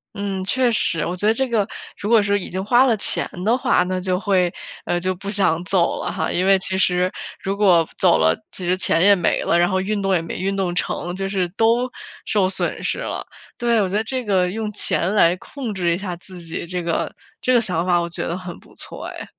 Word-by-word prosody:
嗯， 200 -2 -3
确 250 +6 +1
实。 165 -7 +1
我 175 - -3
觉 185 - -2
得 215 - +5
这 265 +3 0
个 225 -4 +1 0.3
如 205 - -4
果 230 -2 +6
是 205 0 +1
已 190 - -5
经 190 +2 -3
花 240 +5 +4
了 235 -4 +2
钱 - - +3 0.2
的 230 +3 +3
话， 245 - +2
那 185 +1 -2
就 180 0 -1
会 185 -4 +1 0.5
就 185 +1 0
不 200 +2 -7
想 175 -5 +1
走 180 -1 +1
了 - - -2
哈。 160 -4 -2
因 180 - 0
为 195 0 +5
其 190 0 -2
实 180 -1 +2 0.3
如 195 +1 -2
果 180 -6 +4
走 - - +4
了， 80 +1 +3 0.2
其 185 - -4
实 180 +1 +2
钱 175 -2 +2
也 200 +2 +6
没 180 - 0
了， 170 - +2
然 175 +1 +3
后 185 - +1
运 205 +2 -1
动 195 0 +1
也 175 - +2
没 165 - -6
运 195 +2 -1
动 180 -3 -1
成， 175 0 -2
就 195 0 -3
是 190 -3 0
都 230 +6 +1 0.4
受 195 -3 +1
损 190 - -2
失 - - -1
了。 - - -4 0.3
对， 235 -2 +2
我 195 - +1
觉 185 - -3
得 215 - +1
这 255 +2 -3
个 185 -3 +1
用 220 +1 -3
钱 195 -1 0
来 170 -4 +5
控 250 +1 -6
制 175 -3 0
一 - - -1
下 190 -2 -4
自 180 +1 -12
己 165 0 -5
这 180 0 -3
个 165 -1 -1 0.3
这 255 - +1
个 240 - +5
想 180 -6 +2
法 180 -1 +3
我 170 - -3
觉 170 - -4
得 170 - -3
很 185 -1 -8
不 - - -20
错 - - -9
哎。 - - -7
190 Hz, 265 characters per minute, -21 LUFS, 180-210 Hz, 0.5 s, 果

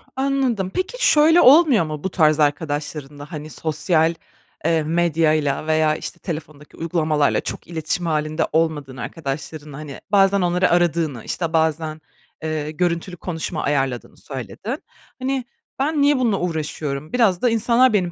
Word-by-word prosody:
Anladım. 265 -8 0
Peki, - - 0
şöyle 315 +3 +6
olmuyor 275 - +6
mu 155 -1 -6
bu 190 - -1
tarz 155 -3 +3
arkadaşlarınla? 145 0 -2
Hani, 155 -2 -6
sosyal, 160 +2 +1 0.5
eee, 165 -1 +2
medyayla 155 -3 +1
veya, 155 -1 +3
işte, - - -7
telefondaki 155 -3 -7
uygulamalarla 155 -3 +1
çok - - -6
iletişim 165 +1 -3
hâlinde 155 0 0
olmadığın 150 -5 0
arkadaşlarınla, 145 +1 -6
hani, 150 -2 -8
bazen 200 -1 +4
onları 180 +1 +2
aradığını, 165 -7 +1
işte, 170 -2 -3
bazen, 160 -1 0 0.4
eee, 155 -1 -2
görüntülü 175 +2 -2
konuşma 160 -1 -4
ayarladığını 135 -4 -1
söyledin. 150 - -6 0.4
Hani, 260 0 -1 0.4
"Ben 295 +2 +1
niye 285 0 +4
bununla 225 -6 +1
uğraşıyorum? 155 -3 -3
Biraz 220 -8 +3
da 245 - +3
insanlar 235 +2 +3
benim 180 -4 +1
160 Hz, 135 wpm, -21 LUFS, 150-195 Hz, 0.5 s, şöyle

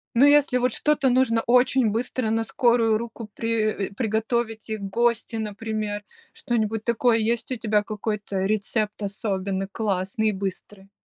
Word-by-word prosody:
Ну 255 - +6
если 285 -3 +5
вот 250 -1 +1
что-то 300 -2 +2
нужно 245 -2 +3
очень 250 -1 +4
быстро 235 +1 -2
на 225 0 +1
скорую 230 -2 +2
руку 230 -1 -7
при 215 -3 -1
э, - - -16
приготовить 225 0 -1
и 220 - -1
гости, 225 +3 0
например, 215 -1 -3 0.3
что-нибудь 225 -2 -1
такое. 235 0 +2
Есть 230 +1 -1
у - - 0
тебя 215 -3 +1
какой-то 210 -2 -3
рецепт 215 +1 -1
особенный, 195 -1 -2
классный 205 +1 -1
и - - +1
быстрый? 195 0 -6
220 Hz, 145 wpm, -24 LUFS, 210-235 Hz, 0.3 s, Ну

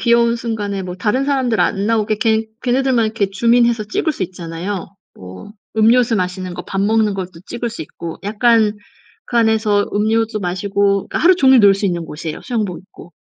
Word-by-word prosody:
귀여운 235 0 +3
순간에 205 -4 -3
뭐 180 -1 -6
다른 235 +8 0
사람들 260 -5 0
안 200 +1 0
나오게 220 -1 +1
걔 220 -1 +1 0.2
걔네들만 255 -1 +2
이렇게 215 -3 -1
줌인 235 +4 +3
해서 230 -3 0
찍을 305 +9 -1
수 195 - -5
있잖아요. 175 +2 -6 0.3
뭐 95 - -11 0.2
음료수 230 +2 +4
마시는 185 -1 -3
거 - - -6
밥 195 - -4
먹는 215 0 +2
것도 185 -3 -6
찍을 235 -1 -4
수 225 - -6
있고 165 +2 -8
약간 220 0 +2 0.5
그 240 - -3
안에서 220 -2 +2
음료수 220 +1 0
마시고 200 +2 0
그러니까 - - -2
하루 365 +3 +5
종일 265 -5 +5
놀 200 -1 +6
수 195 +1 -1
있는 175 -2 -2
곳이에요 155 0 -6
수영복 215 -8 -3
입고. 180 -2 -16
210 Hz, 390 characters per minute, -18 LUFS, 190-235 Hz, 0.5 s, 놀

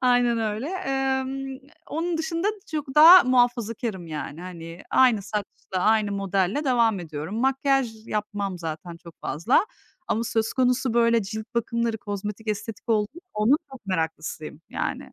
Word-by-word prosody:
Aynen 245 -2 +3
öyle. 220 +4 -2
Emm, 270 -7 -1 0.3
n 260 - -12 0.3
onun 330 +2 -2
dışında 330 +4 -1 0.2
çok 290 -4 -3
daha 335 +4 +10
muhafazakârım 235 -6 +1
yani, 155 0 -6
hani, 170 -1 -9
aynı 245 -6 +4
saçla, 200 -2 -5
aynı 215 +1 +2
modelle 195 +6 0
devam 230 -6 +2
ediyorum. 160 +2 -6
Makyaj 265 -4 +1
yapmam 205 -3 -3
zaten 165 +1 -6
çok 170 -1 -15
fazla. 205 - +2 0.4
Ama 230 - 0
söz 225 -1 0
konusu, 250 -1 +1
böyle, 230 -1 +4
cilt 215 +2 -5
bakımları, 235 -1 -1
kozmetik, 210 +2 -5
estetik 220 +2 -4
oldu 210 -2 +2 0.3
onun 215 +7 +4 0.2
çok 250 -6 -12
meraklısıyım, 160 -3 -3
yani. - - -4
225 Hz, 140 wpm, -25 LUFS, 195-255 Hz, 0.4 s, daha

